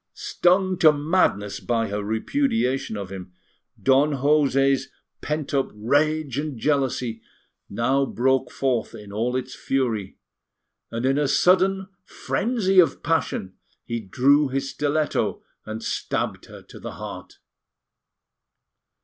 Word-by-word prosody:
Stung 185 +1 +1
to 160 -3 +7
madness 145 - 0
by 115 -2 -1
her 105 +1 -3
repudiation 135 - 0
of 100 -2 -6
him, 90 -2 -8 0.5
Don 140 +3 +3
José's 135 -1 +2 0.3
pent 150 -1 -3
up 135 -1 +1
rage 145 +5 +1
and 150 -3 -4
jealousy 130 -3 0 0.5
now 130 +6 +1
broke 130 +2 +1
forth 125 -4 -1
in 105 -2 -11
all 120 +4 -1
its 130 - -3
fury; 115 -8 -2 0.7
and, 115 +2 -3
in 135 +2 +2
a 145 - +1
sudden 190 +5 +3 0.2
frenzy 205 -5 0
of 165 -6 +3
passion, 160 - -1 0.3
he 115 0 -3
drew 135 +8 +3
his 135 +1 -3
stiletto 150 0 -1 0.2
and 110 +1 -5
stabbed - - -2
her - - -12
to - - -13
the - - -7
heart. - - -9
135 Hz, 125 wpm, -24 LUFS, 115-155 Hz, 0.7 s, to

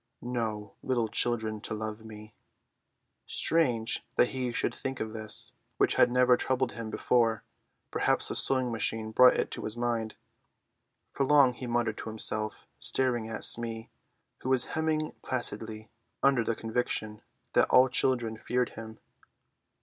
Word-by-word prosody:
"No 110 -4 -3
little 120 -3 0
children 110 -3 +2
to 110 - -4
love 110 0 -5
me!" 110 0 -11 0.9
Strange 125 -9 +1
that 125 - +4
he 130 -2 -3
should - - -1
think 135 -1 -5
of 110 0 -4
this, 110 -1 -5 0.2
which - - +3
had - - +4
never 125 0 +4
troubled 130 0 -1
him 115 -1 -6
before; 115 0 +1 0.5
perhaps - - +1
the - - -3
sewing 130 -2 +1
machine 110 -1 -1
brought 125 +3 +6
it - - -1
to - - -5
his 110 +2 -4
mind. 115 -2 -2 1.0
For 140 - 0
long 135 -2 +5
he 125 +1 -7
muttered 120 -2 -1
to - - -6
himself, 110 0 -1
staring 120 -4 +2
at 110 - -5
Smee, 115 -1 0 0.5
who 130 - -5
was 130 -2 +5
hemming 155 -1 -1
placidly, 110 -3 -4 0.3
under 135 -4 +4
the 115 - -1
conviction 110 -2 -3 0.3
that - - +3
all 130 +1 +6
children 120 -3 +1
feared 125 +2 -1
him. 110 -1 -10
115 Hz, 150 wpm, -29 LUFS, 110-125 Hz, 1.0 s, brought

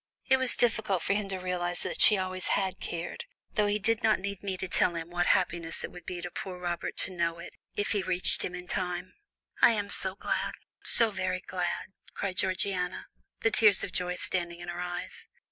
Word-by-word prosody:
It 265 - +4
was 260 -1 +1
difficult 220 -6 +1
for - - +1
him 200 -1 -2
to 190 - -3
realize 180 -1 -1
that - - -4
she 210 - +7
always 185 -1 -2
had 190 -2 -2
cared, 175 - -5 0.3
though 210 -3 +2
he 205 0 +1
did 225 +2 0
not 220 -1 +4
need 200 0 -5
me 195 -2 -3
to 190 - -4
tell 175 -1 +2
him 165 +1 -5
what 175 0 0
happiness 170 -4 +1
it - - -5
would 175 -2 -12
be 175 -1 -4
to 175 0 -6
poor 185 0 -6
Robert 175 -1 -3
to - - +2
know 170 -1 0
it, 170 - -9 0.2
if 205 - -1
he 205 - +1
reached 185 -1 +4
him 180 - -3
in 180 0 -7
time." 180 0 -3 0.5
"I 235 - +7
am 205 -2 -2
so 190 0 +4
glad, - - -2 0.3
so 230 -2 +6
very 185 -2 -2
glad," 180 +1 -3 0.2
cried 190 -2 -3
Georgiana, 185 -1 -1 0.3
the 225 - +2
tears 210 -4 +5
of 200 - -4
joy 180 0 0
standing 175 -2 0
in 175 0 -7
her 175 0 -5
eyes. 180 0 -5
185 Hz, 215 wpm, -29 LUFS, 175-200 Hz, 0.5 s, she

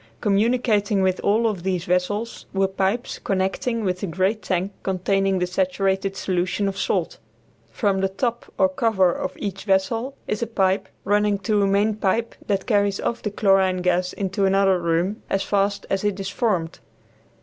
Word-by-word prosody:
Communicating 210 -1 +2
with 185 -1 +1
all 220 +3 +2
of 205 -5 -2
these 180 -1 -1
vessels 205 +6 -1
were 195 0 +3
pipes 195 +5 -1
connecting 195 +5 -1
with 185 -2 -1
the 200 - -3
great 190 +6 0
tank 185 0 -1
containing 195 +1 +1
the 180 - +1
saturated 190 +1 0
solution 185 +2 -1
of 195 - -2
salt. 190 -3 -1 0.5
From 190 - 0
the 195 - +1
top 235 +4 -3
or 285 - +5
cover 225 -10 +2
of 185 - -4
each 195 -2 -5
vessel 225 +7 0
is 210 - -2
a 235 - -1
pipe 190 -3 +1
running 205 0 +2
to 210 0 +2
a 200 - +3
main 205 +2 +2
pipe 215 +2 0
that 195 -2 0
carries 200 -3 +1
off 235 - -2
the 210 - -2
chlorine 195 -3 +2
gas 180 0 +1
into 195 0 -1
another 195 -1 +3
room 170 +5 0
as 195 0 0
fast 200 0 0
as 195 0 0
it 205 -1 -1
is 195 0 -3
formed. 185 -6 -1
195 Hz, 170 wpm, -23 LUFS, 190-210 Hz, 0.5 s, or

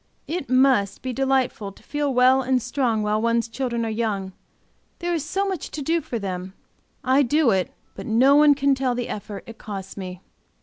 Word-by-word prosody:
It 320 -6 -4
must, 255 -6 +3
be 260 -1 -3
delightful 260 -6 0
to - - -20
feel 290 -1 -1
well 255 +1 +5
and 260 0 +1
strong 245 -3 0
while 210 +1 0
one's 230 0 +1
children 235 -1 -2
are 225 - -2
young, 205 -4 -2 0.6
there 345 0 -2
is 325 -4 -1
so 385 +6 -1
much 375 -6 -4
to 295 - -5
do 330 +4 +1
for 275 -5 -4
them. 190 -2 -5 0.5
I 260 +2 +4
do 285 0 +3
it; 190 -2 0 0.2
but 195 - -8
no 255 +6 +5
one 295 -1 +6
can 280 0 +2
tell 260 -2 0
the 245 0 -3
effort, 205 -1 -6
it 230 -1 -11
costs 195 -2 -7
me. 185 -2 -7
250 Hz, 200 wpm, -23 LUFS, 215-275 Hz, 0.6 s, one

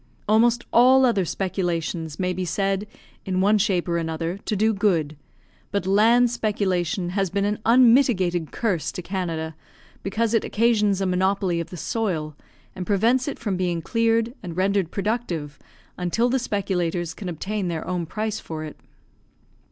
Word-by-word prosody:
Almost 235 +3 +3
all 260 +2 +6
other 205 -7 +2
speculations 170 -4 -2
may 180 -1 0
be 185 +1 -3
said, 195 +2 -1 0.4
in 185 -2 -1
one 205 +3 +4
shape 190 -4 +1
or 170 -1 0
another, 165 +3 -3
to 215 - -1
do 220 +2 +2
good; 175 -8 +1 0.5
but 200 -2 -2
land 230 +5 +4
speculation 190 -6 -1
has 195 0 0
been 200 +2 0
an 210 +1 -1
unmitigated 230 - +4
curse 195 -9 -1
to 180 - -6
Canada, 165 -4 -3 0.5
because 220 +3 -1
it 225 - +3
occasions 210 -3 +2
a - - +1
monopoly 185 -1 +1
of 170 - -5
the 180 - -8
soil, 165 -7 -2 0.4
and 185 -1 -5
prevents 230 +6 +2
it 285 - -3
from 205 -6 -2
being 175 -2 -1
cleared 230 0 +1
and 175 -3 -7
rendered 195 -2 +1
productive, 190 -9 -3 0.4
until 205 +7 +1
the 265 +2 +1
speculators 180 -6 -2
can 190 - -6
obtain 190 +4 -3
their 165 -2 -3
own 180 -2 -2
price 215 +4 -3
for 155 -1 -6
it. 155 - -9
195 Hz, 160 wpm, -24 LUFS, 175-220 Hz, 0.5 s, all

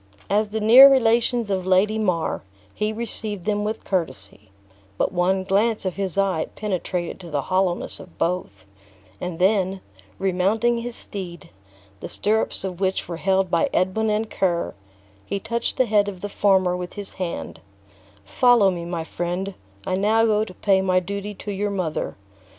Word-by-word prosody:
As 210 +1 +2
the 220 +1 -2
near 250 +6 +9
relations 235 -3 +2
of 190 -1 0
Lady 205 +4 +3
Mar, 180 -6 0 0.3
he 210 0 -1
received 215 -4 -5
them 210 -1 0
with 215 +1 -3
courtesy; 130 - -4 0.5
but - - +1
one 185 +1 +1
glance 205 +3 +1
of 185 - -2
his 195 -2 -3
eye 190 -5 +1
penetrated 185 -4 -3
to 175 -2 -10
the 145 -3 -1
hollowness 185 -2 0
of 180 - -14
both; 165 - -2 0.5
and 180 -2 -4
then, 190 0 +2 0.4
remounting 195 +6 +1
his 240 0 -3
steed, 175 -5 -5 0.5
the - - -7
stirrups 215 -1 0
of 185 -2 -5
which 190 -1 -1
were 170 - -5
held 190 0 +1
by 170 - +2
Edwin 190 +4 +1
and 215 +1 0
Ker, 175 -3 0 0.5
he 200 - -3
touched 235 +3 -2
the 260 - +4
head 210 -2 +2
of 190 -3 -6
the 205 - -4
former 190 -3 +2
with 180 0 -6
his 205 -2 -7
hand; 175 -2 -4 0.6
"Follow 240 - +4
me, 170 -2 -5
my 170 -1 -3
friend; 175 +4 -3 0.3
I 185 - 0
now 220 +3 +3
go 215 -1 +2
to 190 - -8
pay 195 -2 +2
my 185 -1 +2
duty 200 +3 -5
to 205 - -6
your 205 +1 -1
mother. 185 -6 -3
195 Hz, 165 wpm, -23 LUFS, 180-215 Hz, 0.6 s, near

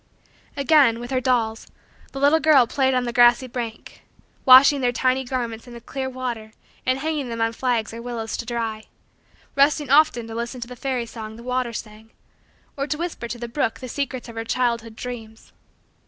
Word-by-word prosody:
Again, 280 -5 +4
with 240 +2 -7
her 255 -1 +1
dolls, 235 -4 0 0.4
the 270 - -6
little 290 +3 +4
girl 305 -6 +5
played 265 +2 +1
on 250 - +1
the 240 -1 -3
grassy 240 +1 +5
bank; 235 -3 -7 0.4
washing 270 +2 +8
their 245 -1 +2
tiny 255 +2 +1
garments 240 -3 -4
in 240 - -11
the - - -8
clear 265 +2 -5
water 240 -4 -5 0.3
and 255 0 +2
hanging 295 -2 -2
them 230 0 -5
on 225 0 +1
the - - -14
flags 235 -4 -1
or 230 - -7
willows 235 -2 -4
to 235 - -5
dry; 225 -3 -3 0.7
resting 285 0 +3
often 285 -5 +4
to 225 - -8
listen 235 +2 -4
to 235 - -6
the 250 - -9
fairy 255 -1 -2
song 220 -2 -8
the 235 - -12
water 250 -1 -1
sang; 220 0 -9 0.7
or 275 0 -3
to 300 - -2
whisper 335 -7 -4
to 240 - -5
the 235 0 -6
brook 230 -2 -2
the 255 - -7
secrets 260 -1 -4
of 235 - -9
her 225 - -3
childhood 235 -1 -1
dreams. 225 -2 -9
245 Hz, 200 wpm, -23 LUFS, 230-265 Hz, 0.7 s, washing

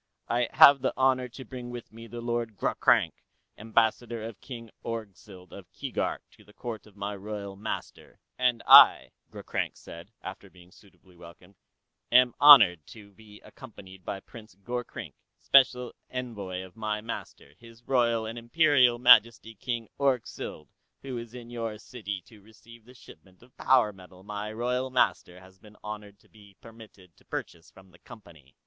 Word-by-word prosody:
"I 120 0 0
have 140 -1 +8
the 130 - -1
honor 130 -1 +2
to 130 +2 -11
bring 125 +1 -9
with 120 -2 -9
me 115 +1 -11
the 120 0 -8
Lord 120 -2 -3
Ghroghrank, - - +2 0.4
Ambassador 115 +1 -1
of 110 -2 -9
King 115 -4 -10
Orgzild 100 -4 -8
of 95 -4 -13
Keegark - - -4
to - - -21
the 105 - -21
court 115 -3 -7
of 105 - -20
my 100 0 -5
royal 100 0 -7
master." 105 +3 -7 0.2
"And 125 -2 0
I," - - +8 0.2
Ghroghrank - - -5
said, 85 +5 -12
after 95 +1 -9
being 90 -1 -19
suitably 95 -2 -22
welcomed, 85 +2 -16 0.6
"am 125 0 +5
honored 105 - +8
to 105 -2 -14
be 105 +1 -17
accompanied 95 -7 -14
by 95 +2 -6
Prince 110 -4 -14
Gorkrink, 120 +5 -7 0.2
special 125 -2 +3 0.2
envoy 100 -8 -6
from 110 - -21
my 105 -1 -2
master, 105 -9 -8
his 115 0 -17
Royal 120 -3 +1
and 115 +2 -6
Imperial 130 -1 +3
Majesty 120 -2 +5
King 115 +1 -5
Orgzild, 130 - -2 0.3
who 135 -2 -6
is 115 +1 -11
in 120 -1 -10
your 115 -2 -5
city 105 -5 -7
to 110 -3 -19
receive 110 +2 -18
the 125 +2 -17
shipment 95 -4 -18
of 125 - -23
power 125 -5 +2
metal 95 -1 -16
my 105 +1 -6
royal 125 +3 -2
master 90 -7 0
has 95 0 -19
been 105 +1 -18
honored 105 -1 -8
to - - -26
be 100 -3 -20
permitted 110 -6 -16
to - - -24
purchase 85 -1 -7
from 95 -1 -19
the 85 - -21
Company." 80 -10 -16
110 Hz, 165 wpm, -27 LUFS, 100-120 Hz, 0.6 s, have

